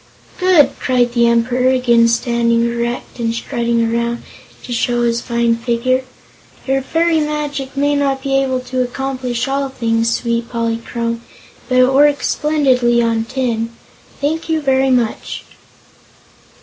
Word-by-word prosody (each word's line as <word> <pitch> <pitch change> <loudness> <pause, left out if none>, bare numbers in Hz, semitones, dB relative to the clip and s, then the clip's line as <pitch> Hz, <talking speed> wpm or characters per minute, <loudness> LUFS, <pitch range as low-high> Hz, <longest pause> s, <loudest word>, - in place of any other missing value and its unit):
"Good!" 355 -7 +5
cried 245 -2 +1
the 235 -1 +3
Emperor, 245 +2 +2
again 240 -3 +4
standing 235 0 +1
erect 235 +1 -3
and 230 -1 0
strutting 235 -1 -1
around 235 0 -1 0.4
to 245 - -5
show 240 0 0
his 235 0 0
fine 235 -1 +1
figure. 240 +2 0 0.6
"Your 270 0 +1
fairy 325 +4 +1
magic 295 -3 -3
may 285 +1 +2
not 275 -2 0
be 270 -1 0
able 260 -1 -1
to 255 0 -2
accomplish 250 -1 -3
all 275 0 -1
things, 230 -3 0
sweet 235 -1 -1
Polychrome, 230 0 -3 0.5
but 255 - +2
it 255 +1 +4
works 290 +1 +3
splendidly 260 -6 +2
on 225 -1 0
tin. 230 -3 -2 0.5
Thank 320 +3 -2
you 320 -1 +1
very 270 -2 +2
much." 245 -4 -1
250 Hz, 135 wpm, -17 LUFS, 235-270 Hz, 0.6 s, Good